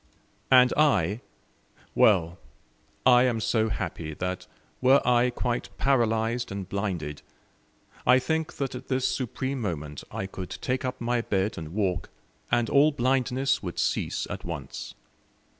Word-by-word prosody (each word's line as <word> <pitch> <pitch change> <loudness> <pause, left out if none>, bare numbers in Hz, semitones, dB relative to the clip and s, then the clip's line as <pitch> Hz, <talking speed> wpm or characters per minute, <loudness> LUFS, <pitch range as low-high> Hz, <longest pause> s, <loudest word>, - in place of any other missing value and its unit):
And 125 -1 +6
I? 110 - +2 0.7
Well, 85 -4 +3 0.7
I 125 -1 +7
am 120 -3 +1
so 110 0 +1
happy 85 -6 -4
that, 90 +2 -4 0.3
were 130 +2 +6
I 125 0 +4
quite 120 0 -2
paralyzed 120 -3 +1
and 100 -2 -5
blinded, 90 -8 -3 0.8
I 125 +1 +6
think 160 +4 -1
that 135 -2 -3
at 125 +1 -8
this 130 -1 +1
supreme 130 +1 -3
moment 75 -8 -4
I 95 - -4
could 95 -1 -7
take 130 +2 -2
up 130 0 -3
my 120 0 0
bed 100 -2 -1
and 80 +2 -7
walk, 95 -5 -1 0.4
and 120 -1 +2
all 145 +5 +5
blindness 135 0 +1
would 90 -3 -6
cease - - -1
at - - -6
once. - - -6
120 Hz, 140 wpm, -27 LUFS, 95-130 Hz, 0.8 s, I